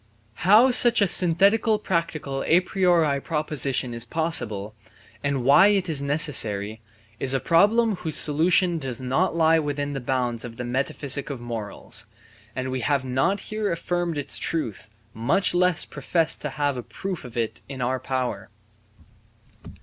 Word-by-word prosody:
How 230 +6 +6
such 240 -1 +6
a 200 - +3
synthetical 200 +6 +3
practical 165 -8 -3
a 175 +2 +4
priori 175 -7 +1
proposition 140 -5 -2
is 115 0 -2
possible, 115 -8 -2 0.5
and 140 -3 -1
why 140 +9 +6
it 200 -3 +1
is 155 -4 0
necessary, 110 -8 +1 0.4
is 135 0 +1
a - - +1
problem 210 - +2
whose 160 -4 -2
solution 170 +3 +3
does 130 -4 -5
not 130 +9 -1
lie 165 0 +3
within 145 -1 -3
the 135 - -4
bounds 125 -2 -2
of 115 -2 -9
the 125 - -5
metaphysic 135 +2 -2
of 140 -4 -5
morals; 115 -3 -5 0.5
and 130 0 -4
we 130 - -3
have 135 +1 -1
not 135 +11 0
here 215 -1 -3
affirmed 175 -1 -2
its 145 - 0
truth, 115 -9 -3 0.2
much 135 - +1
less 180 -1 +2
professed 165 -2 -1
to - - -4
have 145 -3 -2
a - - -4
proof 190 +7 -6
of 120 -2 -10
it 115 -2 -3
in 135 -2 -7
our 130 +1 -1
power. 125 -6 -4
145 Hz, 155 wpm, -24 LUFS, 130-175 Hz, 0.5 s, How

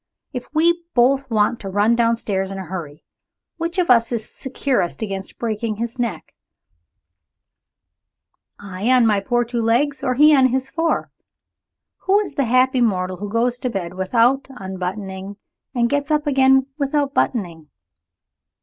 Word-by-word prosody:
If 250 -2 -5
we 340 +3 +2
both 265 +2 +3
want 215 +1 +1
to 195 - -6
run 205 +4 +2
downstairs 230 -5 0
in 195 - -6
a 190 - -6
hurry, 160 -4 -7 0.5
which 335 +2 -4
of 355 -5 +3
us 235 -1 +4
is 225 -2 -3
securest 260 -7 -2
against 195 -2 -6
breaking 220 -1 -2
his 235 +3 -5
neck 225 -9 -3 2.3
I 200 +3 -4
on 255 -2 +5
my 210 -2 +3
poor 240 +4 0
two 235 0 -2
legs, 255 +6 +1
or 255 -1 0
he 300 +3 +6
on 265 -2 +5
his 260 +1 -2
four? 330 +2 -1 1.0
Who 395 +2 +5
is 395 - -6
the 275 -1 0
happy 255 +2 +3
mortal 185 -5 0
who 205 +2 -6
goes 240 +3 0
to 250 - -2
bed 180 -5 -4
without 230 +8 +2
unbuttoning, 190 -2 -6 0.4
and 235 -1 +2
gets 285 +3 -1
up 300 0 +1
again 265 -2 +4
without 280 0 0
buttoning? 170 - -2
235 Hz, 150 wpm, -20 LUFS, 200-265 Hz, 2.3 s, he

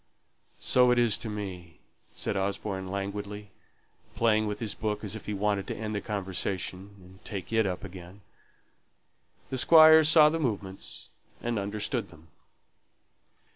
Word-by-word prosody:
"So 125 -1 +3
it 125 - +3
is 120 -3 +4
to 110 - -5
me," 95 -5 -7 0.3
said - - -3
Osborne, 95 0 -3
languidly, 100 +1 -5 0.6
playing 110 -2 +2
with 105 - -3
his 110 -3 -1
book 105 -1 -3
as 105 0 -4
if 110 - -10
he 105 - -2
wanted 100 -1 -1
to - - -4
end 110 0 -5
the 100 - -2
conversation 95 -1 -3
and 95 +1 -18
take 100 0 -6
it 110 -2 +3
up 90 -1 -4
again. 95 +1 -11 1.3
The 130 - 0
Squire 160 +4 +8
saw 150 0 +7
the 165 +1 -2
movements, 100 -9 -4 0.3
and 120 -2 -1
understood 105 +2 -2
them. 80 -1 -18
105 Hz, 145 wpm, -28 LUFS, 95-115 Hz, 1.3 s, Squire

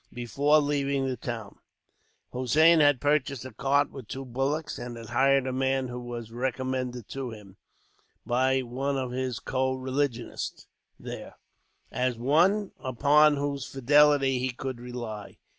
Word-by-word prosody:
Before 140 +5 +2
leaving 140 -2 0
the 130 -1 -1
town, 115 -5 -6 0.7
Hossein 155 +7 +5
had 145 -3 +5
purchased 145 -2 0
a 130 - -8
cart 140 +2 +1
with 130 -5 -9
two 135 +3 -6
bullocks; 135 +5 -2
and 120 -1 -6
had 115 -1 -9
hired 135 +2 +3
a 130 - -2
man 130 0 0
who 125 0 -5
was 120 -2 -7
recommended 130 -1 -3
to 135 -2 -4
him, 105 -3 -12 0.7
by 130 +3 +2
one 135 +3 -2
of 130 -2 -3
his 130 -2 -2
co 130 0 -1
religionists 130 -2 -3 0.3
there, - - -8 0.6
as 125 -1 -1
one 175 - +2
upon 145 +4 +4
whose 140 -1 -2
fidelity 135 0 +4
he 130 +1 -1
could 130 0 -5
rely. 120 -4 -7
130 Hz, 140 wpm, -27 LUFS, 125-140 Hz, 0.7 s, Hossein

